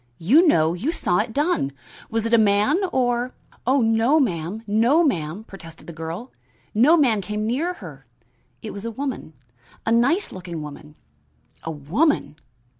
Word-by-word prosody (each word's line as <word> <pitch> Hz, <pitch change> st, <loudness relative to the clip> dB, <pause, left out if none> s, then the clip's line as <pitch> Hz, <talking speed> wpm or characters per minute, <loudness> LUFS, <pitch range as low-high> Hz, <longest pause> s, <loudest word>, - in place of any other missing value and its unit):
You 285 Hz, -, +4 dB
know; 160 Hz, -, +3 dB
you 220 Hz, -, -2 dB
saw 175 Hz, -, 0 dB
it -, -, -1 dB
done. 290 Hz, -, 0 dB, 0.4 s
Was 225 Hz, 0 st, -1 dB
it 230 Hz, -, -1 dB
a -, -, +7 dB
man 210 Hz, -, +3 dB
or 245 Hz, -1 st, 0 dB
" -, -, -29 dB
"Oh 265 Hz, +1 st, +3 dB
no, 225 Hz, +7 st, +3 dB
ma'am, 190 Hz, -, -2 dB
no, 230 Hz, +10 st, +3 dB
ma'am," 175 Hz, -, -1 dB
protested 165 Hz, -6 st, -13 dB
the 170 Hz, -, -9 dB
girl. 165 Hz, +9 st, -6 dB, 0.4 s
"No 270 Hz, +11 st, +5 dB
man 240 Hz, -9 st, +3 dB
came 210 Hz, +2 st, -3 dB
near 290 Hz, +11 st, -1 dB
her. 145 Hz, -, -12 dB, 0.6 s
It 215 Hz, -, -5 dB
was 200 Hz, -, -7 dB
a 230 Hz, -, -3 dB
woman 255 Hz, -, -5 dB, 0.5 s
a 225 Hz, -, 0 dB
nice 270 Hz, -, +2 dB
looking 175 Hz, -4 st, -7 dB
woman." 150 Hz, +1 st, -10 dB, 0.7 s
"A -, -, -6 dB
woman!" 155 Hz, -, 0 dB
220 Hz, 165 wpm, -23 LUFS, 170-260 Hz, 0.7 s, a